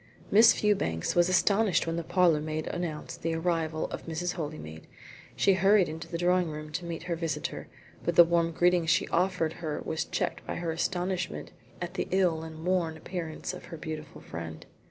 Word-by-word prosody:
Miss 225 +3 +8
Fewbanks 190 - +1
was 175 0 +4
astonished 200 +1 +3
when 165 0 -2
the 170 - -2
parlourmaid 155 -3 +2
announced 165 -4 -4
the 165 0 -1
arrival 165 -2 0
of - - -6
Mrs. 175 +3 -2
Holymead. 150 - -6 0.5
She 195 - +4
hurried 190 -4 +3
to 165 - -9
the 170 - -1
drawing 180 0 +2
room 155 0 -7
to 170 +3 -4
meet 165 -1 -5
her 175 -1 -2
visitor, 165 -3 -3 0.4
but - - 0
the 175 - +10
warm 170 0 +2
greeting 175 0 +3
she - - +3
offered 175 -2 +1
her 155 -3 -2
was 160 0 -1
checked - - -2
by - - -3
her 170 -1 -2
astonishment 180 +1 -2 0.3
at 175 - -5
the - - -2
ill 180 -4 +2
and 160 0 -8
worn 175 -3 +1
appearance 165 0 -5
of 180 - -9
her 165 - -8
beautiful 155 -1 -7
friend. 80 -1 -7
170 Hz, 180 wpm, -29 LUFS, 160-180 Hz, 0.5 s, the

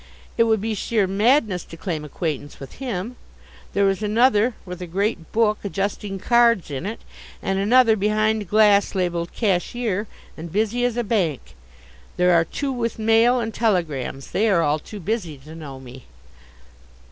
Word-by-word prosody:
It 230 - +4
would 220 -3 +2
be 220 +1 -2
sheer 215 0 0
madness 205 - +2
to 165 - -11
claim 165 -3 -4
acquaintance 150 -1 -4
with 135 - -11
him. 240 -1 -4 0.6
There 200 0 +3
is 195 +1 0
another 225 +1 +3
with 180 -1 -8
a 180 - -5
great 195 -1 -2
book, 215 -2 +2
adjusting 200 0 -3
cards 230 -3 +3
in 140 +7 -4
it; 220 - -6 0.4
and 195 0 -1
another, 230 +2 +5
behind 215 -1 0
glass 205 -1 +4
labelled 175 -2 -1
"Cashier," 210 +1 -1 0.3
and 165 +1 -8
busy 220 +5 0
as 245 -1 -1
a 240 - +1
bank; 170 - -1 0.6
there 180 0 +4
are 165 -1 +4
two 275 - -3
with 235 -3 -2
mail 225 +3 +4
and 225 -2 -3
telegrams. 155 - -1
They 220 +3 +2
are 170 -5 +3
all 150 +1 +1
too 210 +7 -10
busy 180 -5 -3
to 150 +4 -13
know 145 -5 -9
me. 130 -1 -12
200 Hz, 165 wpm, -22 LUFS, 170-225 Hz, 0.6 s, another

